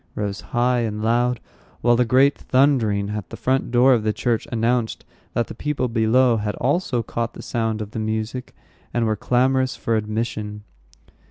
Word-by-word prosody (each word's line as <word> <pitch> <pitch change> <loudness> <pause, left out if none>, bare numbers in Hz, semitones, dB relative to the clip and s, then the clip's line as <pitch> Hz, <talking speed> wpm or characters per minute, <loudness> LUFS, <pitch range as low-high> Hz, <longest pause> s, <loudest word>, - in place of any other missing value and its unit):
rose 100 -1 -3
high 125 +1 +1
and 105 -2 -2
loud; 120 +1 +1 0.4
while 120 +1 +4
a - - +6
great 130 +4 +4
thundering 115 -7 +2
at 105 -3 -5
the - - -8
front 130 +1 0
door 125 +2 +5
of 120 - +2
the 110 0 0
church 115 +1 -1
announced 115 0 0 0.3
that 120 - +1
the - - -9
people 150 -4 -2
below 115 +1 +3
had 105 -1 -2
also 135 -3 0
caught 115 0 -3
the - - -9
sound 110 -2 -1
of 105 - -10
the 110 - -4
music, 110 +3 -3 0.4
and 120 -1 +2
were 110 -1 +1
clamorous 130 +3 +1
for 115 - -1
admission. 105 -1 -3
115 Hz, 175 wpm, -22 LUFS, 110-125 Hz, 0.4 s, a